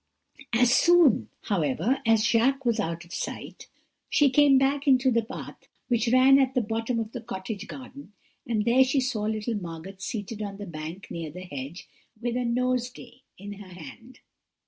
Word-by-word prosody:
"As 240 +1 +4
soon, 345 -5 +5
however, 190 - 0
as 225 -1 +4
Jacques 265 +4 +2
was 235 -2 +1
out 170 -3 -3
of 170 - -13
sight, - - -6 0.4
she 285 -3 +4
came 280 0 +6
back 275 +2 +1
into 260 -1 +4
the 230 -1 +3
path 220 - -9 0.2
which 235 -1 +1
ran 260 +2 +6
at 265 0 +1
the 250 - +3
bottom 225 +2 -2
of 220 -1 -4
the 245 - -6
cottage 200 -1 -6
garden, 275 -2 -10 0.4
and 215 -3 0
there 245 +3 +5
she 270 +2 +1
saw 245 -5 -1
little 220 +2 -2
Margot 170 +3 -8
seated 205 +1 -5
on 200 -1 -5
the 205 - -7
bank 170 +2 -7
under 165 -2 -5
the 180 +5 -9
hedge, 145 +1 -8 0.3
with 240 +1 -2
a 250 - 0
nosegay 250 0 -2 0.2
in 205 +2 -8
her 200 -2 -12
hand. 225 - -12
230 Hz, 175 wpm, -26 LUFS, 195-255 Hz, 0.4 s, came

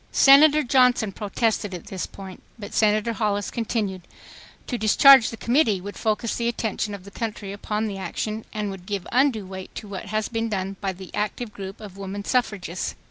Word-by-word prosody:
Senator 300 +2 +7
Johnson 250 -4 +3
protested 205 0 -1
at 175 - -9
this 190 -2 -5
point, 190 -1 -10 0.2
but 205 -3 -9
Senator 215 +1 +2
Hollis 205 -3 -1
continued: 210 -5 -2 0.6
"To 250 - -3
discharge 240 +3 +7
the 225 - -8
committee 235 -5 +2
would 200 +3 -8
focus 220 +1 -1
the 235 - -1
attention 220 -3 -2
of 195 - -11
the 200 - -12
country 210 -3 -5
upon 210 +2 -2
the 200 -3 -4
action 215 +3 -4
and 210 -2 -3
would 185 -1 -10
give 200 -3 -3
undue 245 -5 +2
weight 190 0 -9
to 210 - -7
what 195 -2 -6
has 215 +1 -1
been 225 -1 -2
done 195 -1 -3
by 195 -1 -1
the 185 0 -11
active 210 +2 -3
group 195 0 -8
of 200 -3 -10
woman 200 +1 -6
suffragists." 200 -8 -1
210 Hz, 190 wpm, -24 LUFS, 195-230 Hz, 0.6 s, Senator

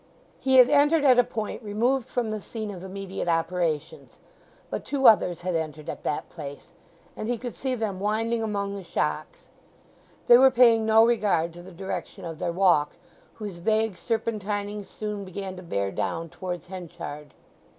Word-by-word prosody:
He 265 0 +2
had 250 -1 +9
entered 295 +2 +4
at 255 -2 +6
a - - +7
point 220 -1 -5
removed 230 +4 0
from 235 -3 -1
the 215 -1 -4
scene 220 -1 -5
of 185 -2 -9
immediate 195 -1 -5
operations; 165 -2 -1 0.5
but - - -3
two 275 -2 -2
others 180 -5 +5
had 180 0 -2
entered 155 -2 -3
at - - -5
that 150 - -2
place, 145 -4 -9 0.4
and 215 - -4
he 245 - 0
could 245 +1 -6
see 260 -1 -2
them 215 -5 -3
winding 225 +3 0
among 200 -2 -2
the 200 -1 -6
shocks. - - -3 0.8
They 240 0 +8
were 265 +1 +8
paying 230 -3 +5
no 220 +1 +6
regard 200 -8 +1
to 175 - -11
the 185 +2 -12
direction 190 +1 -6
of 165 -2 -6
their 175 - -1
walk, 170 -5 +3 0.4
whose 205 -5 -7
vague 220 +2 +1
serpentining 210 -1 -3
soon 210 -1 -5
began 190 0 -6
to - - -8
bear 100 - -2
down 165 +9 -3
towards 180 -1 -6
Henchard. 170 -5 -8
200 Hz, 170 wpm, -26 LUFS, 175-225 Hz, 0.8 s, had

